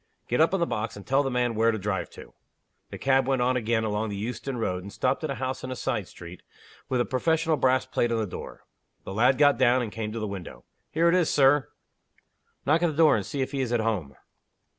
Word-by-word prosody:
"Get 125 Hz, -, +1 dB
up 160 Hz, -, +4 dB
on 195 Hz, -, 0 dB
the 170 Hz, -, +2 dB
box, 110 Hz, -6 st, -3 dB
and 100 Hz, -, -11 dB
tell 135 Hz, +2 st, +3 dB
the 135 Hz, -, -1 dB
man 125 Hz, -2 st, 0 dB
where 115 Hz, +1 st, +2 dB
to 110 Hz, -, 0 dB
drive 100 Hz, -2 st, -3 dB
to." -, -, -13 dB, 0.6 s
The -, -, -7 dB
cab 135 Hz, -1 st, +2 dB
went 130 Hz, -2 st, +1 dB
on 130 Hz, +1 st, +2 dB
again 115 Hz, -2 st, 0 dB
along 110 Hz, 0 st, -1 dB
the 100 Hz, -, -4 dB
Euston 125 Hz, +5 st, -4 dB
Road, 90 Hz, -5 st, -2 dB
and 100 Hz, +2 st, -9 dB
stopped 130 Hz, +7 st, -1 dB
at 155 Hz, -, -2 dB
a 135 Hz, -, -2 dB
house 130 Hz, +1 st, -4 dB
in 130 Hz, -, -5 dB
a 130 Hz, -, -4 dB
side 120 Hz, -6 st, -2 dB
street, 85 Hz, 0 st, -11 dB, 0.5 s
with 130 Hz, -2 st, 0 dB
a 120 Hz, -, +2 dB
professional 160 Hz, +7 st, +1 dB
brass 130 Hz, -2 st, +2 dB
plate 120 Hz, -2 st, 0 dB
on 115 Hz, -, +1 dB
the 110 Hz, -, 0 dB
door. 90 Hz, -, -9 dB, 0.4 s
The -, -, -7 dB
lad 125 Hz, +5 st, +3 dB
got 145 Hz, -4 st, +4 dB
down, 130 Hz, 0 st, +4 dB
and 110 Hz, -, -5 dB
came 110 Hz, -1 st, -4 dB
to 115 Hz, -, -4 dB
the 110 Hz, -, -2 dB
window. 90 Hz, -, -8 dB, 0.2 s
"Here 165 Hz, +2 st, +2 dB
it 170 Hz, -, +4 dB
is, 180 Hz, -3 st, +3 dB
Sir." 140 Hz, -2 st, +4 dB, 1.0 s
"Knock 155 Hz, +4 st, +3 dB
at 175 Hz, -, +3 dB
the 160 Hz, -, -2 dB
door, 155 Hz, -1 st, +5 dB
and 105 Hz, -, -1 dB
see 140 Hz, +7 st, -4 dB
if 130 Hz, -, -2 dB
he 140 Hz, -2 st, -2 dB
is 125 Hz, -3 st, -2 dB
at 120 Hz, -, +2 dB
home." 105 Hz, -11 st, -2 dB
125 Hz, 255 wpm, -26 LUFS, 110-135 Hz, 1.0 s, door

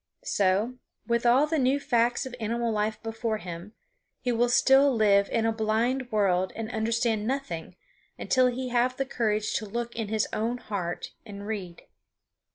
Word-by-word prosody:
So, 205 Hz, +6 st, +1 dB, 0.3 s
with 235 Hz, +1 st, +1 dB
all 255 Hz, +5 st, +5 dB
the 310 Hz, 0 st, 0 dB
new 265 Hz, +2 st, +2 dB
facts 240 Hz, -3 st, +1 dB
of 260 Hz, -, -7 dB
animal 230 Hz, +1 st, -1 dB
life 215 Hz, 0 st, -1 dB
before 225 Hz, 0 st, -2 dB
him, 180 Hz, +1 st, -8 dB, 0.5 s
he 250 Hz, -, -1 dB
will 240 Hz, +1 st, +2 dB
still 270 Hz, +3 st, +5 dB
live 205 Hz, -4 st, +3 dB
in 230 Hz, -1 st, 0 dB
a 225 Hz, -, +3 dB
blind 230 Hz, +4 st, 0 dB
world 190 Hz, -3 st, +2 dB
and 225 Hz, +1 st, -5 dB
understand 225 Hz, -1 st, 0 dB
nothing 255 Hz, -12 st, -4 dB, 0.4 s
until 255 Hz, -1 st, +3 dB
he 250 Hz, +1 st, -2 dB
have 245 Hz, +1 st, +1 dB
the 270 Hz, -, 0 dB
courage 215 Hz, -5 st, -1 dB
to 220 Hz, -, -5 dB
look 235 Hz, +3 st, -4 dB
in 225 Hz, -2 st, -3 dB
his 215 Hz, 0 st, 0 dB
own 230 Hz, +3 st, -1 dB
heart 190 Hz, -7 st, -4 dB
and 200 Hz, -2 st, -9 dB
read. 195 Hz, -6 st, -5 dB
225 Hz, 165 wpm, -27 LUFS, 210-245 Hz, 0.5 s, all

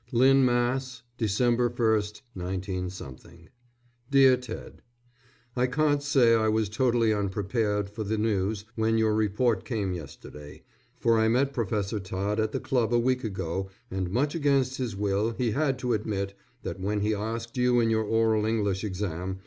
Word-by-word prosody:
LYNN, 135 Hz, +3 st, +5 dB
MASS., 125 Hz, +1 st, 0 dB, 0.2 s
_December 120 Hz, +3 st, +2 dB
1, 110 Hz, -3 st, 0 dB
19 90 Hz, 0 st, -3 dB
_ 85 Hz, 0 st, -11 dB, 0.6 s
DEAR 135 Hz, -2 st, +6 dB
TED: 125 Hz, -3 st, -9 dB, 0.7 s
I 125 Hz, 0 st, +2 dB
can't 145 Hz, +2 st, +1 dB
say 135 Hz, -5 st, +4 dB
I 110 Hz, -1 st, +3 dB
was 110 Hz, -1 st, +1 dB
totally 115 Hz, 0 st, +2 dB
unprepared 105 Hz, +1 st, -1 dB
for 105 Hz, +2 st, -6 dB
the 110 Hz, +2 st, -2 dB
news, 105 Hz, -1 st, -1 dB
when 110 Hz, 0 st, +1 dB
your 110 Hz, -1 st, +2 dB
report 110 Hz, +1 st, +1 dB
came 105 Hz, -7 st, -2 dB
yesterday, 75 Hz, -2 st, -10 dB, 0.4 s
for 115 Hz, -1 st, +3 dB
I 110 Hz, -, +3 dB
met 135 Hz, +5 st, +2 dB
Professor 105 Hz, -2 st, -1 dB
Todd 100 Hz, +3 st, -2 dB
at 110 Hz, 0 st, 0 dB
the -, -, -2 dB
club 125 Hz, -4 st, 0 dB
a 120 Hz, -, +4 dB
week 125 Hz, +2 st, +1 dB
ago 95 Hz, -2 st, -3 dB, 0.2 s
and 95 Hz, -1 st, -2 dB
much 135 Hz, +9 st, 0 dB
against 140 Hz, -4 st, +1 dB
his 120 Hz, -6 st, -3 dB
will 105 Hz, +3 st, 0 dB
he 120 Hz, -3 st, 0 dB
had 135 Hz, +1 st, 0 dB
to 125 Hz, -1 st, -1 dB
admit, 100 Hz, -2 st, -2 dB, 0.3 s
that -, -, -5 dB
when 105 Hz, +2 st, -1 dB
he 105 Hz, +1 st, +1 dB
asked 115 Hz, +2 st, -4 dB
you 125 Hz, 0 st, +3 dB
in 115 Hz, -1 st, +2 dB
your 110 Hz, 0 st, +2 dB
oral 110 Hz, 0 st, +2 dB
English 100 Hz, -3 st, 0 dB
exam. 95 Hz, -2 st, -3 dB
110 Hz, 165 wpm, -27 LUFS, 100-120 Hz, 0.7 s, DEAR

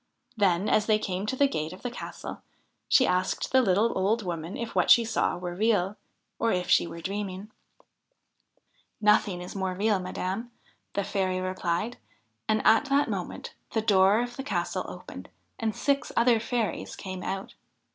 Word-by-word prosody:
Then, 195 Hz, -2 st, +2 dB
as 215 Hz, -, +2 dB
they 215 Hz, -1 st, +4 dB
came 195 Hz, -1 st, -3 dB
to 260 Hz, -, -1 dB
the 280 Hz, +1 st, +4 dB
gate 160 Hz, -, -3 dB
of 185 Hz, -, -13 dB
the 245 Hz, -, -3 dB
castle, 240 Hz, -, -7 dB, 0.5 s
she 260 Hz, -, +5 dB
asked 185 Hz, +1 st, 0 dB
the 260 Hz, -, +6 dB
little 210 Hz, +1 st, +2 dB
old 210 Hz, +4 st, +1 dB
woman 170 Hz, 0 st, -4 dB
if 235 Hz, -1 st, -5 dB
what -, -, +2 dB
she 235 Hz, -, +7 dB
saw 225 Hz, -, 0 dB
were 175 Hz, 0 st, -5 dB
real, 205 Hz, -1 st, +1 dB, 0.4 s
or 230 Hz, -, +2 dB
if 180 Hz, -1 st, -1 dB
she -, -, +5 dB
were 170 Hz, -, -8 dB
dreaming? 195 Hz, +2 st, -4 dB, 0.8 s
' -, -, -51 dB, 0.7 s
Nothing 210 Hz, -4 st, +3 dB
is 180 Hz, -, -9 dB
more 190 Hz, -1 st, -2 dB
real, 205 Hz, +1 st, +2 dB
madam,' 185 Hz, +5 st, -4 dB, 0.5 s
the 200 Hz, -, +1 dB
fairy 190 Hz, -2 st, -1 dB
replied. 185 Hz, +4 st, -2 dB, 0.5 s
And 215 Hz, 0 st, +1 dB
at 225 Hz, +6 st, +6 dB
that 280 Hz, +1 st, +2 dB
moment -, -, -5 dB, 0.2 s
the 220 Hz, -, +1 dB
door 200 Hz, +1 st, +4 dB
of 245 Hz, 0 st, -7 dB
the 270 Hz, -, -4 dB
castle 285 Hz, -, -2 dB
opened -, -, -9 dB, 0.3 s
and 220 Hz, -2 st, -1 dB
six 280 Hz, 0 st, 0 dB
other 235 Hz, -1 st, +5 dB
fairies 230 Hz, -1 st, -2 dB
came 185 Hz, -1 st, -6 dB
out. 195 Hz, +1 st, -4 dB
205 Hz, 175 wpm, -27 LUFS, 185-230 Hz, 0.8 s, she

